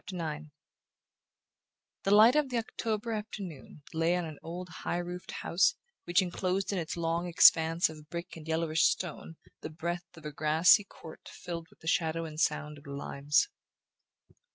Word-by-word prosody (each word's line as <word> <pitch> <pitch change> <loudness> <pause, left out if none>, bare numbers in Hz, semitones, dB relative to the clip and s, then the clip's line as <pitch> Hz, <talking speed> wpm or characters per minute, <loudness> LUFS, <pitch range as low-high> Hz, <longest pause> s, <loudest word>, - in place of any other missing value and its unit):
BOOK - - -6
II 155 -2 -2
IX 155 +1 -11 1.6
The 195 +1 +5
light 225 +5 +7
of 300 -3 +2
the 245 - -1
October 225 0 -3
afternoon 195 -9 -7
lay 165 +2 +2
on 180 -1 -1
an 155 -2 -8
old 175 +2 -6
high - - -1
roofed 175 +1 -6
house 175 +2 +1 0.3
which 175 +2 +3
enclosed 185 +2 -1
in 190 - 0
its 170 +1 -4
long 170 +1 -1
expanse 165 0 +6
of 155 -1 -12
brick 170 +1 -6
and 160 -1 -11
yellowish 160 0 +2
stone 165 -2 -2 0.2
the - - -6
breadth 170 +2 -5
of 155 - -13
a 150 - -4
grassy 160 +7 +4
court 160 -4 -12
filled 170 -2 -7
with - - -24
the 160 - -10
shadow 165 0 +1
and 155 -1 -7
sound 150 -1 -1
of 145 - -17
limes. 140 - 0
170 Hz, 170 wpm, -30 LUFS, 160-180 Hz, 1.6 s, light